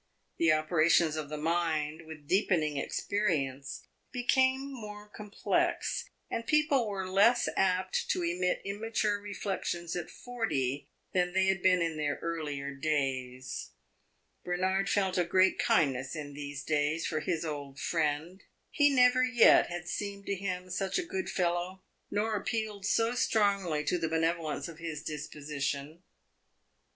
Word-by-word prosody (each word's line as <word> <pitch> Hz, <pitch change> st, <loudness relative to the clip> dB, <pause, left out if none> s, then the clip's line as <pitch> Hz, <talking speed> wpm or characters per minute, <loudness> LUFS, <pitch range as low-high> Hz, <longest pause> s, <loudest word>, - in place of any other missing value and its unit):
The 165 Hz, -1 st, +5 dB
operations 155 Hz, +1 st, +3 dB
of 155 Hz, -2 st, -4 dB
the 150 Hz, -, -4 dB
mind, 160 Hz, -1 st, -1 dB
with 155 Hz, -2 st, -10 dB
deepening 175 Hz, -6 st, +2 dB
experience, 140 Hz, -5 st, -2 dB, 0.3 s
became 260 Hz, +2 st, +2 dB
more 210 Hz, -4 st, -8 dB
complex, 210 Hz, 0 st, -1 dB, 0.2 s
and 230 Hz, -, -4 dB
people 300 Hz, -6 st, +3 dB
were 190 Hz, -2 st, -3 dB
less 205 Hz, +6 st, +4 dB
apt 185 Hz, 0 st, +1 dB
to 180 Hz, -, +1 dB
emit 180 Hz, +1 st, 0 dB
immature 210 Hz, 0 st, -1 dB
reflections 190 Hz, -4 st, -3 dB
at 175 Hz, -2 st, -4 dB
forty 145 Hz, -, -2 dB, 0.2 s
than 180 Hz, -1 st, +1 dB
they 190 Hz, 0 st, +3 dB
had 190 Hz, -1 st, +1 dB
been 180 Hz, -1 st, +4 dB
in 165 Hz, -2 st, -2 dB
their 145 Hz, -1 st, 0 dB
earlier 145 Hz, -4 st, -3 dB
days. 130 Hz, -3 st, -2 dB, 0.7 s
Bernard 190 Hz, +2 st, 0 dB
felt 190 Hz, -2 st, +1 dB
a -, -, +4 dB
great 185 Hz, +2 st, +3 dB
kindness 135 Hz, -2 st, +2 dB
in 145 Hz, -2 st, -6 dB
these 145 Hz, -1 st, -6 dB
days 150 Hz, +1 st, 0 dB
for 155 Hz, -, -1 dB
his 165 Hz, +1 st, -2 dB
old 145 Hz, -3 st, -5 dB
friend; 160 Hz, +3 st, -1 dB, 0.3 s
he 290 Hz, -1 st, +4 dB
never 255 Hz, -1 st, +5 dB
yet 250 Hz, -2 st, +6 dB
had 175 Hz, 0 st, -6 dB
seemed 200 Hz, +2 st, -4 dB
to -, -, -1 dB
him 185 Hz, -1 st, -4 dB
such 190 Hz, +1 st, -1 dB
a 365 Hz, -, 0 dB
good 375 Hz, +1 st, -3 dB
fellow, 180 Hz, +1 st, -1 dB, 0.3 s
nor 215 Hz, +2 st, 0 dB
appealed 210 Hz, -1 st, -2 dB
so 225 Hz, +2 st, +2 dB
strongly 200 Hz, -10 st, +1 dB
to 175 Hz, +4 st, 0 dB
the 165 Hz, -1 st, -1 dB
benevolence 160 Hz, -2 st, 0 dB
of 165 Hz, -1 st, -10 dB
his 160 Hz, -3 st, -5 dB
disposition. 150 Hz, 0 st, -4 dB
175 Hz, 140 wpm, -31 LUFS, 155-205 Hz, 0.7 s, yet